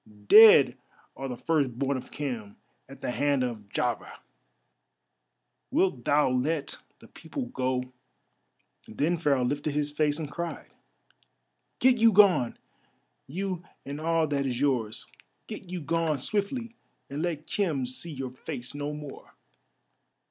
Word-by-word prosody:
"Dead 180 - +8 0.4
are 135 - -5
the 125 - -5
first 140 -7 0
born 140 +1 0
of 130 0 -6
Khem 120 -8 -5 0.3
at - - -12
the - - -2
hand 140 0 +1
of 110 -5 -5
Jahveh. - - -2 1.5
Wilt 165 -11 +1
thou 145 +1 +4
let 140 +4 -1 0.2
the - - -16
people 275 -4 -6
go?" 130 - -2 0.9
Then 150 +10 0
Pharaoh 140 -6 +2
lifted 145 +3 -2
his 145 0 0
face 150 0 +1
and 155 -3 -5
cried: 170 +1 -5 1.1
"Get 255 -2 +4
you 225 0 +6
gone—you 185 - 0 0.2
and 145 +2 -6
all 165 0 +2
that 140 -2 -1
is 125 -2 -2
yours. 125 -6 0 0.4
Get 190 - -9
you 180 -1 -4
gone 160 0 0
swiftly, 215 - -2 0.3
and 140 +2 -5
let 160 -3 -2
Khem 160 -10 -1
see 130 +7 -2
your 135 -3 -5
face 130 -1 -6
no 145 +1 -4
more." 150 -2 -10
145 Hz, 135 wpm, -28 LUFS, 130-165 Hz, 1.5 s, Dead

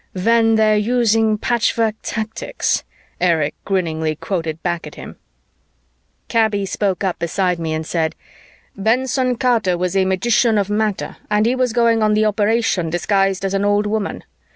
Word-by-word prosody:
"When 225 +4 +3
they're 215 -1 +3
using 225 -1 +2
patchwork 230 -1 +1
tactics?" 225 - -2 0.4
Erich 165 -5 +1
grinningly 160 -5 -1
quoted 165 -2 -4
back 170 -3 -2
at 150 - -11
him. - - -10 1.1
Kaby 215 -3 +1
spoke 195 0 -1
up 185 -2 -1
beside 180 +1 -1
me 165 -1 -3
and 160 0 -4
said, 160 -1 -1 0.6
"Benson 250 +4 +1
Carter 230 -7 +1
was 180 +1 -2
a 190 -1 +3
magician 215 +4 +2
of 205 0 0
matter 210 -1 -1
and 210 0 +2
he 240 - +2
was 255 -2 0
going 230 -1 +2
on 215 0 +3
the 215 0 +2
operation 210 -4 +1
disguised 195 +3 0
as 195 - -2
an 195 0 0
old 205 +1 +2
woman. 210 0 -3
210 Hz, 155 wpm, -19 LUFS, 180-225 Hz, 1.1 s, When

